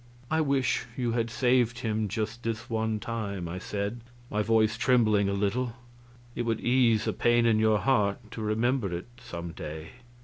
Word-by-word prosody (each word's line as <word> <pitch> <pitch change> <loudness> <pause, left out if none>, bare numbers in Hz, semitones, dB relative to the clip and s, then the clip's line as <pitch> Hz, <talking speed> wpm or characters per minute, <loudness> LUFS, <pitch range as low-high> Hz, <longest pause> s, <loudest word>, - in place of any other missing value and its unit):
"I 160 0 +3
wish 140 -4 +1
you 120 -3 0
had 115 0 0
saved 120 -1 +2
him 110 -2 0
just 110 +3 -3
this 115 +1 -4
one 110 -1 0
time," 105 -6 -4
I 90 +2 -5
said, 105 +5 -3 0.3
my 105 - +1
voice 110 0 +3
trembling 110 -6 +3
a - - 0
little; 115 +5 0 0.6
"it - - -2
would 115 -2 0
ease 120 -3 +3
a - - 0
pain 120 0 +3
in 110 -2 +4
your 110 -1 +4
heart 105 -2 +1
to 115 - -6
remember 110 0 0
it 90 - -8
some 85 -7 -7
day." 80 -1 -7
110 Hz, 175 wpm, -28 LUFS, 105-120 Hz, 0.6 s, in